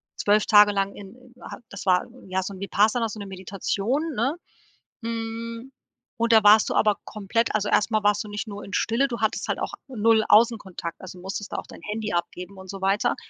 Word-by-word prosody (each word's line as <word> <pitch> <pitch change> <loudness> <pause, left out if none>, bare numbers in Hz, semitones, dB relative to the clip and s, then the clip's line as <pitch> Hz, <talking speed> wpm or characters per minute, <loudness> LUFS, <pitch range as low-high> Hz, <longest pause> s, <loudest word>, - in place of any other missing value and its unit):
12 210 +1 +2
Tage 210 -1 +7
lang 195 0 -1
in 240 +5 -13
ha - - -8
das 200 - -8
war 180 -1 +3 0.2
ja 190 0 0
so 195 +2 -5
'n 190 - -11
Vipassana 215 +3 +2
so 215 - -8
'ne 200 - -6
Meditation, 200 - -2
ne? 265 +10 0 0.7
Hm, 230 +2 -5 0.5
und 230 0 +1
da 220 - +7
warst 210 +1 +6
du - - -1
aber 210 -2 +3
komplett 220 +3 -1
also, 210 -1 0
erst 215 - +2
mal 215 -2 +1
warst 205 0 +2
du 210 - -10
nicht 205 +2 -5
nur 205 -1 -7
in 195 - -10
Stille, 245 +5 +1
du 235 - -4
hattest 220 - 0
halt - - -1
auch - - -3 0.2
null 225 -2 +3
Außenkontakt, 205 -7 +2
also, 185 -1 -10
musstest 195 +3 -6
da - - -2
auch - - -6
dein - - -12
Handy 215 -1 -4
abgeben 180 +2 -4
und 190 0 -12
so 195 0 -6
weiter. 195 +2 +1
210 Hz, 210 wpm, -25 LUFS, 195-230 Hz, 0.7 s, Tage